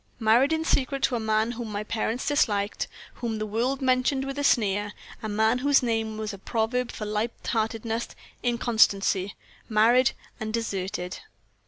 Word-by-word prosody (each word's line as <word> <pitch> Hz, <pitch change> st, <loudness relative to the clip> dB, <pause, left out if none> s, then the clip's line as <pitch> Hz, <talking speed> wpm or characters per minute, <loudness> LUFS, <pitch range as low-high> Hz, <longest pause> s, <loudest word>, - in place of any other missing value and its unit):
Married 235 Hz, +6 st, +4 dB
in 320 Hz, 0 st, 0 dB
secret 275 Hz, -1 st, 0 dB
to 255 Hz, -, +2 dB
a -, -, 0 dB
man 220 Hz, +1 st, +1 dB
whom 235 Hz, -2 st, -5 dB
my 205 Hz, 0 st, -3 dB
parents 225 Hz, +3 st, -2 dB
disliked, 210 Hz, -8 st, +1 dB, 0.3 s
whom 230 Hz, -2 st, -2 dB
the 215 Hz, -, -2 dB
world 245 Hz, +6 st, -1 dB
mentioned 260 Hz, +1 st, +2 dB
with 275 Hz, +1 st, -4 dB
a -, -, -1 dB
sneer 205 Hz, -5 st, +2 dB, 0.3 s
a 220 Hz, -, -4 dB
man 220 Hz, +3 st, +2 dB
whose 280 Hz, 0 st, +4 dB
name 225 Hz, -2 st, -1 dB
was 215 Hz, -1 st, -4 dB
a 200 Hz, -, -9 dB
proverb 235 Hz, +4 st, -1 dB
for 215 Hz, -, -6 dB
light 210 Hz, +3 st, -1 dB
heartedness, 225 Hz, +1 st, -1 dB, 0.3 s
inconstancy 220 Hz, -5 st, +2 dB, 0.3 s
married 235 Hz, +4 st, +4 dB, 0.3 s
and 220 Hz, 0 st, -2 dB
deserted! 190 Hz, -5 st, -3 dB
225 Hz, 160 wpm, -26 LUFS, 215-250 Hz, 0.3 s, Married